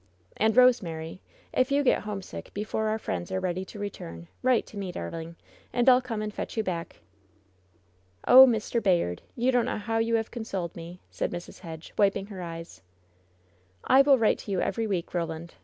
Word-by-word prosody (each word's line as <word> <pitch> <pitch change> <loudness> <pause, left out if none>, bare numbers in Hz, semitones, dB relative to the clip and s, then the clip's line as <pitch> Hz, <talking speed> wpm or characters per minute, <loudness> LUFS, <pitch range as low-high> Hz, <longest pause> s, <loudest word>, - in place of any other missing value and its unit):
"And, 220 +2 +1
Rosemary, 185 -10 +3 0.3
if 255 +2 +2
you 285 +1 +3
get 265 - +3
homesick 205 -3 -7
before 215 +1 -2
our 215 0 0
friends 90 - -4
are 190 - 0
ready 185 0 -2
to 200 - -11
return, 85 - -7
write 255 -2 +3
to 210 - -12
me, 195 -2 -4
darling, 165 - -6 0.4
and 245 0 +1
I'll 255 0 +7
come 225 -4 -4
and 210 0 -4
fetch - - -6
you 220 - +2
back." 170 -4 -5 1.3
"Oh, 260 +1 +10
Mr. 230 0 0
Bayard! 170 - +1
you 250 +2 +2
don't 245 -2 +2
know - - -2
how 225 +2 -1
you 230 +1 +1
have 225 -1 -1
con 235 -2 -5
soled 185 -6 -4
me 170 +2 -9
!" - - -38
said - - -2
Mrs. 175 - -8
Hedge, 165 -3 -9
wiping 200 -1 +3
her 200 -3 -8
eyes. 165 -1 -8 1.0
"I 265 - +6
will 275 -1 +5
write 225 -3 +2
to 205 - -7
you 190 - 0
every 225 -1 -1
week, 185 -5 -3
Roland. 170 -1 -4
205 Hz, 195 wpm, -27 LUFS, 170-230 Hz, 1.3 s, Oh